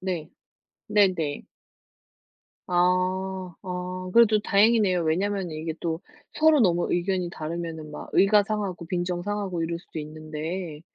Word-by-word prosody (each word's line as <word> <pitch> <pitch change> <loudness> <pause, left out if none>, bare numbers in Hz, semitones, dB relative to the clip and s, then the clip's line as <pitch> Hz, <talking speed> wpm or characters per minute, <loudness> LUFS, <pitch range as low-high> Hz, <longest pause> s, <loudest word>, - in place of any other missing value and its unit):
네. 175 -4 -3 0.6
네 200 -3 +4
네. 150 -4 -3 1.3
아 185 +1 0
아 180 0 -5
그래도 225 -2 +6
다행이네요. 205 -3 +3
왜냐면 185 +2 0
이게 155 +1 -4
또 165 -1 -2 0.3
서로 315 -2 +5
너무 175 -5 +2
의견이 180 0 0
다르면은 160 -1 -5
막 - - -8
의가 205 +1 +5
상하고 200 -5 -3
빈정상하고 180 +1 -2
이럴 170 +1 -3
수도 160 - -8
있는데 155 +2 -6
180 Hz, 265 characters per minute, -26 LUFS, 165-195 Hz, 1.3 s, 그래도